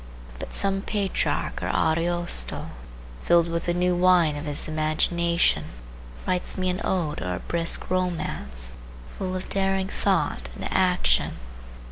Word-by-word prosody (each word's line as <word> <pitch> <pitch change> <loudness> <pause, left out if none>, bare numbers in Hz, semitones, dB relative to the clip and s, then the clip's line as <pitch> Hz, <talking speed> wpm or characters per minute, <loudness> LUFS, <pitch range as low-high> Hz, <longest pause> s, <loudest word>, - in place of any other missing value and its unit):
But - - -6
some 195 -1 +2
Petrarch 200 -2 -1
or - - -2
Ariosto, 165 - 0 0.5
filled 170 -1 +4
with 170 0 -2
the 175 - +1
new 180 0 +2
wine 175 -4 +4
of 145 +2 -5
his 145 -1 -2
imagination, 170 +2 +1 0.6
writes 180 +1 +1
me 185 -1 +1
an 180 - -4
ode 170 -6 -1
or 90 0 -2
a - - -5
brisk 170 0 0
romance, 70 - -1 0.5
full 185 -1 -2
of 185 - -5
daring 195 -1 0
thought 60 - 0
and - - -5
action. - - +2
170 Hz, 135 wpm, -25 LUFS, 155-185 Hz, 0.6 s, filled